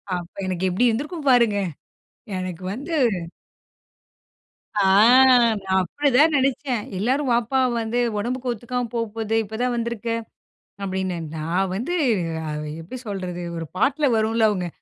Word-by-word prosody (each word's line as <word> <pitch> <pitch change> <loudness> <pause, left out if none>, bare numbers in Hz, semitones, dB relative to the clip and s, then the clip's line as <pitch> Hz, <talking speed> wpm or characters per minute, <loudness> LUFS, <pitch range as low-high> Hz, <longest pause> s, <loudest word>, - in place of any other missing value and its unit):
அப்ப 175 0 -7
எனக்கு 185 0 -1
எப்பிடி 215 +8 +2
இருந்திருக்கும் 290 +6 -3
பாருங்க. 235 -5 +4 0.8
எனக்கு 185 -1 -5
வந்து 285 +9 -6 1.8
ஆ. 205 - +2 0.8
நான் 190 0 +1
அப்பதான் 290 - +3
நினைச்சேன். 260 -3 0 0.2
எல்லாரும் 260 +7 0
வாப்பா! 240 +3 +1 0.2
வந்து 230 +2 -1 0.2
உடம்புக்கு 250 +3 -2
ஒத்துக்காம 240 +1 -3
போப்போது 225 -1 -2
இப்ப 220 +2 -7
தான் 250 0 +1
வந்துருக்க! 235 -1 -3 0.7
அப்பிடின்னு, 190 -2 -2 0.2
நான் 170 +5 -1
வந்து 250 - -3 0.5
அ - - -3 0.3
எப்பிடி 245 +10 -8
சொல்றது? 185 -3 -4
ஒரு 165 - -4
பாட்ல 280 +3 +2
வரும்ல 220 0 +2
அவுங்க. 185 -4 -2
225 Hz, 120 wpm, -23 LUFS, 190-250 Hz, 1.8 s, பாருங்க